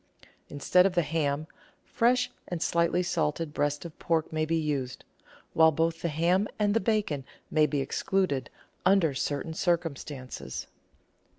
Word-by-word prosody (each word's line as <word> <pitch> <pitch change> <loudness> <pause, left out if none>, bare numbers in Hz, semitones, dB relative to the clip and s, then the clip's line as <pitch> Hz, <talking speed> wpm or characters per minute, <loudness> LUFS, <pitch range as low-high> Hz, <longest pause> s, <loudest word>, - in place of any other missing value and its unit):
Instead 180 +6 +4
of 190 - -4
the 175 - +3
ham, 150 -1 -1 0.4
fresh 250 +1 +2 0.2
and 175 - -3
slightly 170 +1 +2
salted 160 -3 -1
breast 145 +2 -1
of 165 - -10
pork 160 -2 0
may 155 0 +1
be 165 +1 0
used, 145 -6 -2 0.5
while 160 0 +6
both 165 +1 0
the - - 0
ham 175 +6 +2
and 205 -1 +2
the 225 - +3
bacon 200 -10 0 0.3
may 155 -1 +4
be 145 -3 0
ex - - -3
cluded 185 -9 0 0.4
under 180 -5 +4
certain 145 +4 -2
circumstances. 145 - -3
160 Hz, 150 wpm, -28 LUFS, 145-180 Hz, 0.5 s, while